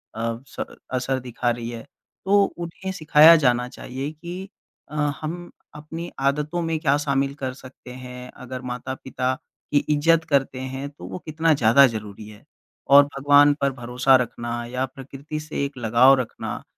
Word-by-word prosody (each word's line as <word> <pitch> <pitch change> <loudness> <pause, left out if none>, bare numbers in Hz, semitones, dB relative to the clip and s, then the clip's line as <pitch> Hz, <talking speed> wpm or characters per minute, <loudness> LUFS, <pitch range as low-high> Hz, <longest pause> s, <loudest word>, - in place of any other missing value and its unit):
अ, 115 +1 -3
स - - -5 0.3
असर 130 +1 -1
दिखा 120 -1 -3
रही 120 -1 -3
है। 115 -1 -7 0.4
तो 200 +1 +5
उन्हें 175 +2 -6
सिखाया 155 -1 +7
जाना 125 -5 +2
चाहिए 135 +4 -6
कि 175 +5 -8 0.4
अ, - - -8 0.3
हम 175 +3 -6 0.2
अपनी 160 +3 -7
आदतों 150 +5 0
में 165 -1 -1
क्या 145 -3 +2
शामिल 140 -1 0
कर 130 -1 -2
सकते 130 -1 -13
हैं। 125 0 -9
अगर 130 0 -8
माता-पिता 130 +1 -3 0.4
की - - +5
इज़्ज़त 160 +2 +3
करते 135 -2 +1
हैं 135 +2 -5
तो 140 -10 -12
वो 95 0 -6
कितना 160 +1 +2
ज़्यादा 135 +1 +6
ज़रूरी 105 -2 -7
है। 105 0 -15 0.5
और 145 - +10
भगवान 145 +1 +4
पर 140 0 +2
भरोसा 125 +2 +2
रखना 120 -1 -1 0.2
या 125 +2 -2
प्रकृति 135 +3 -8
से 155 -2 -4
एक 140 -1 -8
लगाव 120 +3 +5
रखना, 125 - -5
135 Hz, 160 wpm, -23 LUFS, 125-150 Hz, 0.5 s, और